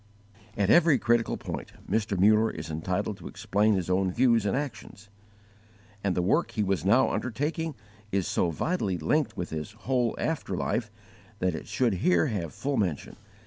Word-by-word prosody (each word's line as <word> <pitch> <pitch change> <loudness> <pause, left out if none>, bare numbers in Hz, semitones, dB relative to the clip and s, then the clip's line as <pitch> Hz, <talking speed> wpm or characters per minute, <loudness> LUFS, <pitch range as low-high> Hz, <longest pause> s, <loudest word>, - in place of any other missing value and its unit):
At 100 -1 +2
every 165 -4 +6
critical 120 -1 +1
point - - -6
Mr. 105 -3 0
Muller 110 +3 +5
is 80 - -6
entitled 95 +6 -2
to - - -9
explain 105 0 +1
his 90 -3 -2
own 95 0 +1
views 115 -1 +3
and 100 - +1
actions; 110 -6 -6 0.9
and 95 -3 +1
the 90 - +1
work 150 - +2
he 105 - -1
was 95 -3 0
now 115 +8 +4
undertaking 150 +5 -2 0.4
is 95 -2 0
so 90 - +1
vitally 100 - -1
linked 140 - 0
with 90 - -4
his 80 +6 -5
whole 120 +1 0
after 160 -2 -2
life 115 -2 -1 0.5
that 90 -3 0
it 80 - -6
should 120 -5 +1
here 90 -2 +4
have 90 -7 -3
full 140 0 -2
mention. 90 -8 -2
105 Hz, 170 wpm, -28 LUFS, 95-125 Hz, 0.9 s, every